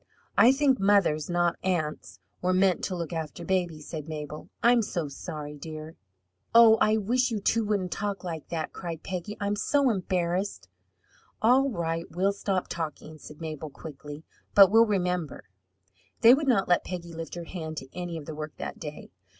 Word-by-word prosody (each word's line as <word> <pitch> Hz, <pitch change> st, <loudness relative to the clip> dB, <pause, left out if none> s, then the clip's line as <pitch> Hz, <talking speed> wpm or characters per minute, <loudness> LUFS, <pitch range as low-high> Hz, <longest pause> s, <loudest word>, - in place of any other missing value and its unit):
"I 240 Hz, -, +7 dB
think 270 Hz, -1 st, +2 dB
mothers, 195 Hz, -7 st, +3 dB
not 175 Hz, -1 st, +1 dB
aunts, 170 Hz, -5 st, -2 dB, 0.2 s
were 185 Hz, 0 st, +1 dB
meant 185 Hz, -1 st, +3 dB
to 185 Hz, -, -3 dB
look 170 Hz, -2 st, -4 dB
after 160 Hz, +1 st, -5 dB
babies," 175 Hz, -5 st, -1 dB
said 155 Hz, -2 st, -6 dB
Mabel. 150 Hz, -1 st, -6 dB
"I'm 240 Hz, 0 st, +5 dB
so 175 Hz, -7 st, -2 dB
sorry, 150 Hz, +1 st, -7 dB
dear!" 155 Hz, +1 st, -8 dB, 0.6 s
"Oh, 230 Hz, -1 st, +8 dB
I 215 Hz, +1 st, +4 dB
wish 245 Hz, +5 st, +1 dB
you 225 Hz, -3 st, -2 dB
two 225 Hz, +3 st, +1 dB
wouldn't 200 Hz, -4 st, -1 dB
talk 200 Hz, -1 st, -3 dB
like 165 Hz, -4 st, -6 dB
that!" 160 Hz, -2 st, -3 dB
cried 170 Hz, -3 st, -6 dB
Peggy. 190 Hz, +3 st, -5 dB
"I'm 205 Hz, 0 st, 0 dB
so 280 Hz, +6 st, +2 dB
ashamed." 185 Hz, -1 st, -1 dB, 0.8 s
"All 260 Hz, +4 st, +5 dB
right, 165 Hz, -5 st, -2 dB
we'll 190 Hz, +4 st, +1 dB
stop 195 Hz, -2 st, -1 dB
talking," 155 Hz, -1 st, -6 dB
said 150 Hz, +2 st, -12 dB
Mabel 155 Hz, -1 st, -5 dB
quickly, 145 Hz, +1 st, -10 dB, 0.3 s
"but 195 Hz, -2 st, +9 dB
we'll 225 Hz, +1 st, +6 dB
remember." 180 Hz, -6 st, -1 dB, 0.8 s
They 230 Hz, +2 st, +9 dB
would 290 Hz, +2 st, +1 dB
not 235 Hz, -7 st, +3 dB
let 175 Hz, -, +3 dB
Peggy 170 Hz, -2 st, -6 dB
lift 165 Hz, 0 st, -6 dB
her 175 Hz, -, -5 dB
hand 160 Hz, -2 st, -6 dB
to 135 Hz, -1 st, -8 dB
any 175 Hz, -2 st, -4 dB
of 155 Hz, -, -8 dB
the 155 Hz, -, -6 dB
work 155 Hz, 0 st, -7 dB
that -, -, -6 dB
day. 150 Hz, -2 st, -8 dB
175 Hz, 175 wpm, -27 LUFS, 160-205 Hz, 0.8 s, but